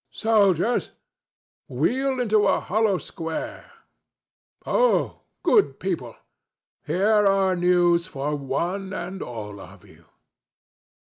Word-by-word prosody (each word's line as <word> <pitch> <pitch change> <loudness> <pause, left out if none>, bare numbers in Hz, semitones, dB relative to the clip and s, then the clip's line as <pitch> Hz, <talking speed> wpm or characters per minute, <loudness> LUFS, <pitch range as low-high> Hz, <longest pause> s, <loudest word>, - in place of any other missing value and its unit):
—Soldiers, 215 0 +1 0.7
wheel 265 0 0
into 215 -4 +2
a - - +2
hollow 210 -1 +1
square.—Ho, 305 - -4 0.2
good 420 -4 +3
people! - - -4 0.7
Here 205 +6 +3
are 195 -1 +2
news 175 -1 +3
for 150 -3 -3
one 175 +8 -3
and 185 +1 -5
all 105 -4 -7
of 90 0 -14
you." - - -20
190 Hz, 90 wpm, -24 LUFS, 165-215 Hz, 0.7 s, good